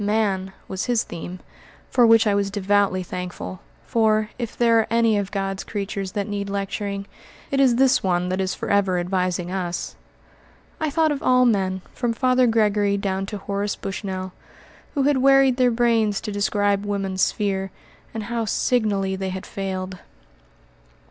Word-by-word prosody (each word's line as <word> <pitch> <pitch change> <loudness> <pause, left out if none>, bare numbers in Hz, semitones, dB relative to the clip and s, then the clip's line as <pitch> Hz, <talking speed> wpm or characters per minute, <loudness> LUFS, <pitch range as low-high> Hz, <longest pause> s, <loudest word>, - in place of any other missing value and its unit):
"Man" 200 -3 0 0.2
was 190 0 -3
his 240 -2 +1
theme, 175 +2 -8 0.5
for 245 -2 +5
which 225 0 +6
I 210 - +3
was 200 0 +1
devoutly 200 -1 +1
thankful; 180 0 -6 0.3
for, 215 -1 +2
if 235 -3 -5
there 230 -1 +4
are 220 - +1
any 230 -1 +3
of 200 -1 -3
God's 195 -1 -2
creatures 195 -2 -4
that 200 -1 -2
need 200 -1 -3
lecturing, 200 0 -3 0.5
it 275 - +1
is 260 -3 +5
this 265 +1 +4
one 180 -1 0
that 185 +1 -1
is 185 -1 -1
forever 200 -2 +1
advising 180 0 -1
us. 180 -2 -3 0.8
I 315 - 0
thought 315 +2 +2
of 285 - -2
all 250 0 +4
men, 190 -5 +1
from 240 -2 -1
Father 255 +1 +3
Gregory 210 -3 +2
down 195 -1 -2
to 210 - -5
Horace 200 +1 -2
Bushnell, 190 -2 -5 0.6
who 280 - +2
had 285 0 +3
wearied 270 -1 +5
their 250 -1 +4
brains 230 -3 +2
to 215 - -5
describe 205 0 +1
woman's 195 -2 -2
sphere, 195 -2 0 0.4
and 220 -1 -5
how 230 +1 -2
signally 205 -4 +1
they 190 0 -3
had 185 0 -5
failed. 185 -1 -5
200 Hz, 160 wpm, -23 LUFS, 190-230 Hz, 0.8 s, which